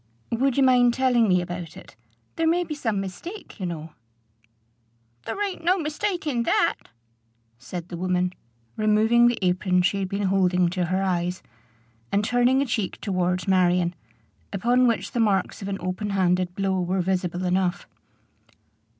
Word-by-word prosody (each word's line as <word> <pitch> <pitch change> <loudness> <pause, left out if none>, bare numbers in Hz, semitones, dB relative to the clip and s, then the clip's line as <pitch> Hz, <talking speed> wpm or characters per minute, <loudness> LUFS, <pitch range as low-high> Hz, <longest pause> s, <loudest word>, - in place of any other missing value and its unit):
"Would 260 +3 +1
you 275 - +5
mind 245 -2 +4
telling 250 -3 +3
me 180 -1 +3
about 175 -2 -6
it? - - -14 0.4
There 325 - +1
may 345 +2 +2
be 320 - -5
some 225 -9 -2
mistake, 215 - -8
you 185 - -2
know." 160 -2 -6 1.3
"There - - -4
ain't 375 -4 -7
no 365 +3 +3
mistake 345 +3 -2
in 255 -6 0
that," 235 - +2 0.9
said 170 +8 -7
the 175 - -6
woman, 180 0 0 0.4
removing 220 +3 +4
the 240 - +1
apron 180 0 +2
she 200 +2 +1
had 190 -1 -2
been 200 +1 -2
holding 185 -2 +2
to 180 0 -1
her 185 +3 0
eyes, 180 -1 -1 0.7
and 205 +1 +1
turning 245 +3 +3
a - - -3
cheek 220 -6 -2
towards 180 -2 -1
Marion, 180 -2 +3 0.6
upon 240 +5 +2
which 230 - -1
the 240 - -2
marks 200 -4 +1
of 195 - -5
an 195 -1 -2
open 185 +4 -3
handed 180 -2 +1
blow 190 -1 0
were 180 +1 0
visible 180 -1 -1
enough. 180 0 0
195 Hz, 160 wpm, -24 LUFS, 180-240 Hz, 1.3 s, you